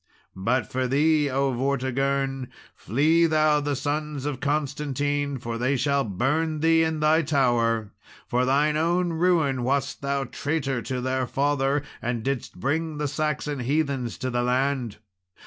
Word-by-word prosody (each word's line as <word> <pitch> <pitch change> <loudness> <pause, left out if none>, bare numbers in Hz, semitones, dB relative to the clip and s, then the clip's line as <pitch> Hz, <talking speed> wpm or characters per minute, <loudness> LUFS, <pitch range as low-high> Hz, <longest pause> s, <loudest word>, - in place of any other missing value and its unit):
"But 115 +7 +1
as - - -19
for 130 0 0
thee, 150 +2 +3
O 135 0 0
Vortigern, 135 +1 -1 0.3
flee 155 - +2
thou 155 -1 +3
the 145 0 -1
sons 145 0 -3
of 145 -3 -3
Constantine, 145 -1 -1
for 115 -1 -5
they 130 +3 +1
shall 140 +2 +1
burn 150 - -1
thee 165 0 +4
in 160 -1 -1
thy 155 +2 +4
tower. 120 -7 +1 0.4
For 125 +1 +1
thine 145 +4 +2
own 170 +2 +1
ruin 160 -6 +2
wast 140 +2 -1
thou 140 0 -1
traitor 135 -1 -2
to 125 +2 -3
their 130 0 -1
father, 140 +1 +1 0.2
and 120 -1 -2
didst 135 -8 -3
bring 155 - -1
the 150 0 -1
Saxon 150 -1 -2
heathens 135 -2 -1
to 130 +2 -3
the 120 0 0
land. 125 -2 0
140 Hz, 150 wpm, -25 LUFS, 130-150 Hz, 0.4 s, thee